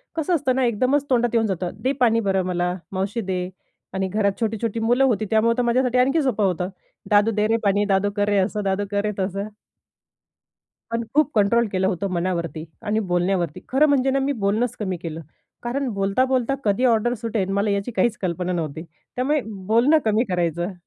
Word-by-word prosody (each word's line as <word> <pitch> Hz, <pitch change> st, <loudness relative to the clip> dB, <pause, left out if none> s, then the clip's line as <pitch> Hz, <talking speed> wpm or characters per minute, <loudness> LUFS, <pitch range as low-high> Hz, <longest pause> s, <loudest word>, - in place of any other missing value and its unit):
कसं 330 Hz, +2 st, +1 dB
असतं 265 Hz, -4 st, 0 dB
ना 265 Hz, -, +1 dB
एकदमच 255 Hz, +5 st, +1 dB
तोंडात 240 Hz, -2 st, +3 dB
येऊन 225 Hz, -1 st, +3 dB
जातं, 180 Hz, -2 st, -2 dB
"दे 260 Hz, -, +2 dB
पाणी 230 Hz, -2 st, +4 dB
बरं 195 Hz, -3 st, +1 dB
मला, 180 Hz, 0 st, -1 dB, 0.2 s
मावशी 200 Hz, +4 st, -2 dB
दे" 185 Hz, -2 st, -3 dB, 0.4 s
आणि 190 Hz, 0 st, -1 dB
घरात 200 Hz, 0 st, 0 dB
छोटी-छोटी 225 Hz, 0 st, -1 dB
मुलं 245 Hz, +4 st, +2 dB
होती 220 Hz, -5 st, +2 dB
त्यामुळं 230 Hz, +2 st, +2 dB
तर -, -, +2 dB
माझ्यासाठी 250 Hz, +1 st, +1 dB
आणखी 275 Hz, +5 st, +3 dB
सोपं 215 Hz, -6 st, +1 dB
होतं. 180 Hz, 0 st, -1 dB, 0.4 s
"दादू 210 Hz, +2 st, +4 dB
दे 210 Hz, 0 st, +1 dB
रे 225 Hz, +1 st, +2 dB
पाणी, 205 Hz, 0 st, +2 dB
दादू 195 Hz, 0 st, +2 dB
कर 205 Hz, 0 st, +1 dB
रे 205 Hz, -, +2 dB
असं, 205 Hz, +2 st, 0 dB
दादू 195 Hz, +1 st, 0 dB
कर 200 Hz, -, +1 dB
रे, 210 Hz, -, 0 dB
तसं." 195 Hz, +2 st, -2 dB, 1.4 s
पण 230 Hz, 0 st, -2 dB
खूप 300 Hz, 0 st, +3 dB
कंट्रोल 225 Hz, +3 st, +3 dB
केलं 190 Hz, 0 st, +1 dB
होतं 195 Hz, +1 st, -1 dB
मनावरती 170 Hz, -3 st, -2 dB, 0.2 s
आणि 215 Hz, +1 st, 0 dB
बोलण्यावरती. 175 Hz, -3 st, 0 dB
खरं 280 Hz, +4 st, +4 dB
म्हणजे 270 Hz, -2 st, +3 dB
ना 275 Hz, -, +1 dB
मी 275 Hz, +1 st, 0 dB
बोलणंच 220 Hz, +4 st, 0 dB
कमी 185 Hz, -3 st, -2 dB
केलं. 165 Hz, -1 st, -5 dB, 0.4 s
कारण 260 Hz, +3 st, -2 dB
बोलता-बोलता 255 Hz, +6 st, +1 dB
कधी 210 Hz, +4 st, +1 dB
ऑर्डर 240 Hz, 0 st, +3 dB
सुटेल 215 Hz, -4 st, -1 dB
मला 200 Hz, +1 st, +1 dB
याची 200 Hz, +3 st, -1 dB
काहीच 240 Hz, 0 st, +1 dB
कल्पना 180 Hz, 0 st, -1 dB
नव्हती. 160 Hz, -3 st, -3 dB, 0.3 s
त्यामुळे 285 Hz, +4 st, +1 dB
बोलणं 225 Hz, +9 st, +2 dB
कमी 220 Hz, +3 st, +2 dB
करायचं. 175 Hz, 0 st, -1 dB
210 Hz, 185 wpm, -22 LUFS, 190-240 Hz, 1.4 s, पाणी